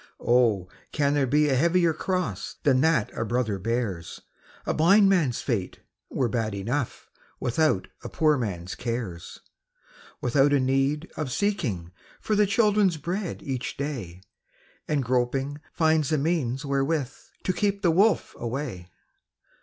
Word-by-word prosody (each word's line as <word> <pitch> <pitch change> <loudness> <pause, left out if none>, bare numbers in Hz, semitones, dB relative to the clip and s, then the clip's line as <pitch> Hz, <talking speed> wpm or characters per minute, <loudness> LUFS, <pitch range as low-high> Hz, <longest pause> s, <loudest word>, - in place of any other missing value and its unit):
Oh, 115 -7 +3 0.2
can 145 -1 +1
there 145 -2 +2
be 150 +4 +3
a 135 - +2
heavier 170 +3 +3
cross 175 - -3
Than 130 -3 +4
that 160 -8 +2
a - - -1
brother 110 -3 -1
bears? 105 -5 -3 0.5
A - - 0
blind 195 +6 +5
man's 155 -11 +1
fate 105 -8 -2 0.3
were 130 - 0
bad 110 -3 -2
enough 120 +6 -3 0.3
Without 150 +5 +1 0.2
a - - -6
poor 155 -1 +3
man's 95 -8 -4
cares; 115 -8 -5 0.8
\V - - 0
ithout 140 +3 +4
a - - +3
need 135 +5 0
of 150 -5 -3
seeking 120 - -1 0.3
for 215 - -1
The 205 0 +4
children's 205 -4 +3
bread 175 +5 -4
each 130 -3 -4
day, 115 - -5 0.6
And 145 -3 0
groping, 130 +4 -1
finds 160 -3 +2
the 155 - +2
means 140 -3 -1
wherewith 140 0 0 0.3
To 185 - 0
keep 200 +1 -1
the 175 - +4
wolf 200 +6 +2
away. 120 -7 -4
135 Hz, 145 wpm, -26 LUFS, 120-160 Hz, 0.8 s, blind